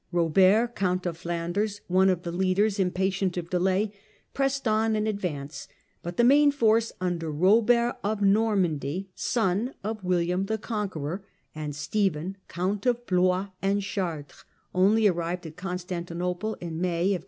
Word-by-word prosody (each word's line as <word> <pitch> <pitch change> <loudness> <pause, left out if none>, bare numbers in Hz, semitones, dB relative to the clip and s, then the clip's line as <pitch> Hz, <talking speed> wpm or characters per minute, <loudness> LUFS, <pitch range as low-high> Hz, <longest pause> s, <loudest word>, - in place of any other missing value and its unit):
Eobert 190 +7 +4
Count 185 -3 -1
of 175 -2 -2
Flanders, 175 +5 -2
one 185 +2 +4
of 180 -2 0
the 170 - -4
leaders, 190 +3 +1
impatient 190 0 0
of 170 -1 -5
delay, 190 +3 +1 0.4
pressed 275 -1 0
on 220 0 +2
in 215 0 0
advance, 165 -9 -4 0.3
but 175 0 -6
the 240 - +4
main 285 +4 +6
force, 230 -5 +2
under 175 -3 -2
Eobert 230 +9 +3
of 210 +1 -1
Normandy, 195 -5 +1
son 220 +4 0
of 215 0 -4
William 180 +1 0
the 220 +1 -1
Conqueror, 195 - -4 0.3
and 150 -2 -5
Stephen, 180 +2 -1
Count 195 +6 -2
of 240 0 +1
Blois 185 +1 +2
and 200 +1 +1
Chartres, 170 -7 -4 0.3
only 205 +4 +4
arrived 175 -1 -1
at 160 -1 -8
Constanti 180 -2 -5
nople 180 +5 -2
in 165 -1 -5
May 180 +2 +1
1097. 185 - -1
185 Hz, 150 wpm, -27 LUFS, 175-215 Hz, 0.4 s, main